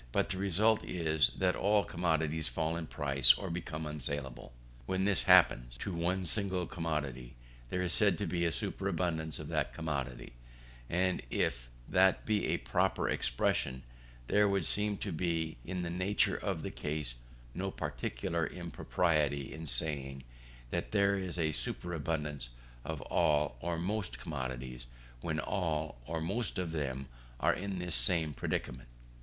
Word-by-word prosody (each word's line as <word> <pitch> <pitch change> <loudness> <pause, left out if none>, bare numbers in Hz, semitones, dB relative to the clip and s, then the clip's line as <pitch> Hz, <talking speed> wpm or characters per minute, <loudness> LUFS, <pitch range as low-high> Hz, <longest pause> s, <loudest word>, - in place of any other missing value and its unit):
But - - +1
the 95 - -1
result 105 +3 +3
is, 80 -4 +2
that 90 -1 +2
all 105 +1 +3
commodities 80 -2 0
fall 80 0 -1
in 85 -2 -4
price, 70 -4 +5
or 95 -3 -5
become 80 -2 -4
unsaleable. 70 -4 -4 0.4
When 95 0 +1
this 100 -4 +2
happens - - +5
to 95 +9 -4
one 90 +2 0
single 95 0 0
commodity, 75 -8 -3 0.3
there 90 +4 -1
is 90 - +2
said - - +4
to - - -2
be 85 -1 -1
a 85 - +2
superabundance 85 -4 -1
of - - -7
that - - -1
commodity; 65 -7 -4 0.6
and 90 +1 +1
if - - -1 0.2
that 95 0 +4
be 105 -2 +1
a - - +1
proper - - +1
expression, 65 +2 0 0.4
there 105 +8 +4
would 100 -4 +1
seem 105 0 0
to 100 - -4
be 80 -3 -1
in 90 +3 -3
the 85 - -3
nature 95 +4 +2
of - - -2
the - - -3
case 75 -4 -3 0.4
no 95 +2 -2
particular - - -2
impropriety 75 -4 0
in 80 +1 -6
saying 70 0 -1 0.5
that - - -2
there 100 -1 +4
is 95 -3 -3
a 80 -2 +1
superabundance 75 -5 -2 0.3
of - - -4
all 75 -4 +2
or 85 +4 -2
most 95 +3 -2
commodities, 65 -4 -5 0.3
when 80 +4 -2
all 80 -8 -1
or 80 +1 -2
most 100 +8 -2
of 90 -3 -2
them 70 -4 -3 0.3
are - - +4
in 100 0 -3
this 90 -1 -2
same 75 +5 +6
predicament. 60 -3 -3
80 Hz, 150 wpm, -33 LUFS, 70-90 Hz, 0.6 s, same